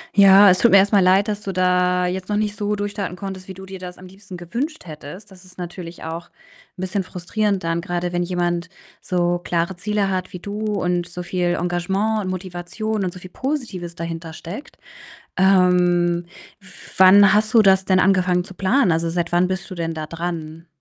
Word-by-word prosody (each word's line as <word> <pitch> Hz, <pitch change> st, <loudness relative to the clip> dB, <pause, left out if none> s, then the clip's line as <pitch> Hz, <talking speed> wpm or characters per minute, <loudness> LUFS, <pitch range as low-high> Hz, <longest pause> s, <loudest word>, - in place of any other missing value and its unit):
Ja, 200 Hz, 0 st, +8 dB
es 185 Hz, -, +4 dB
tut 235 Hz, -, +4 dB
mir 195 Hz, -, +8 dB
erst 200 Hz, +2 st, +4 dB
mal 205 Hz, -, +5 dB
leid, 190 Hz, +3 st, +4 dB
dass 210 Hz, -1 st, -2 dB
du 195 Hz, -2 st, -5 dB
da 180 Hz, 0 st, +2 dB
jetzt 185 Hz, +1 st, -3 dB
noch 210 Hz, -, -1 dB
nicht 210 Hz, -1 st, -1 dB
so 210 Hz, 0 st, -1 dB
durchstarten 205 Hz, -3 st, -4 dB
konntest, 190 Hz, 0 st, -7 dB
wie 190 Hz, -, -7 dB
du 190 Hz, +1 st, -11 dB
dir 190 Hz, 0 st, -9 dB
das 180 Hz, -1 st, -9 dB
am 185 Hz, -, -12 dB
liebsten 190 Hz, 0 st, -12 dB
gewünscht 235 Hz, -, -5 dB
hättest. 160 Hz, +6 st, -10 dB
Das 185 Hz, 0 st, -16 dB
ist 185 Hz, -, -18 dB
natürlich 175 Hz, -1 st, -8 dB
auch 165 Hz, +2 st, -6 dB, 0.5 s
'n -, -, -7 dB
bisschen 190 Hz, +1 st, -2 dB
frustrierend 195 Hz, +2 st, -2 dB
dann, 165 Hz, 0 st, -1 dB
grade 175 Hz, +1 st, -3 dB
wenn 175 Hz, 0 st, -1 dB
jemand 175 Hz, 0 st, -1 dB, 0.3 s
so 175 Hz, -1 st, 0 dB
klare 175 Hz, +1 st, -2 dB
Ziele 205 Hz, +1 st, -1 dB
hat 185 Hz, -1 st, -3 dB
wie 180 Hz, -, -6 dB
du 205 Hz, +3 st, -6 dB
und 180 Hz, -4 st, -1 dB
so 180 Hz, 0 st, -7 dB
viel 175 Hz, 0 st, -1 dB
Engagement 190 Hz, +5 st, -1 dB
und -, -, -3 dB
Motivation 185 Hz, +3 st, -4 dB
und 180 Hz, -, -3 dB
so 180 Hz, -, -10 dB
viel 185 Hz, -, -11 dB
Positives 225 Hz, -, -4 dB
dahintersteckt. 165 Hz, -, -7 dB, 0.6 s
Ähm, 180 Hz, -2 st, +3 dB, 0.7 s
wann 190 Hz, +1 st, +7 dB
hast 215 Hz, +2 st, +1 dB
du 225 Hz, -, +7 dB
das 190 Hz, -1 st, +4 dB
denn 185 Hz, -1 st, +3 dB
angefangen 185 Hz, -1 st, +2 dB
zu 190 Hz, +1 st, -12 dB
planen? 200 Hz, +4 st, +2 dB
Also, 165 Hz, +1 st, 0 dB
seit 170 Hz, 0 st, -2 dB
wann 175 Hz, +1 st, +3 dB
bist 190 Hz, +2 st, -4 dB
du 185 Hz, -, -7 dB
denn 165 Hz, -1 st, -3 dB
da 155 Hz, -1 st, -5 dB
dran? 165 Hz, -1 st, -5 dB
185 Hz, 200 wpm, -21 LUFS, 175-195 Hz, 0.7 s, Ja